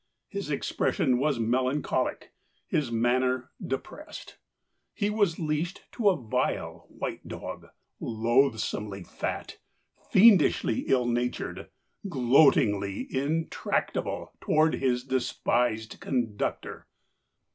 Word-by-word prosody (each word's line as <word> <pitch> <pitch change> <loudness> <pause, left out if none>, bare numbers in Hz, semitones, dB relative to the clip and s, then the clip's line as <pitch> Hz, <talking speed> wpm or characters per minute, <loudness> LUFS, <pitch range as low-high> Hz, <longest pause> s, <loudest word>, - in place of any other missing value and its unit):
His - - -5
expression 125 -1 +1
was 145 -1 +1
melancholic, 130 +5 0 0.3
his 140 -6 -1
manner 125 +2 +1
depressed. - - -7 0.6
He 205 +1 0
was 205 -6 +1
leashed 160 +3 -2
to 220 -4 +3
a 190 - +2
vile 115 -4 -2
white - - -6
dog, - - -7 0.3
loathsomely 110 -4 0
fat, - - -5 0.5
fiendishly 190 - +5
ill 125 -2 +3
natured, 120 +1 -2 0.4
gloatingly 120 - +3
intractable 155 +5 -1
toward 155 +1 +3
his 125 -2 0
despised 120 -3 0
conductor. 120 -6 -3
130 Hz, 90 wpm, -28 LUFS, 115-150 Hz, 0.6 s, fiendishly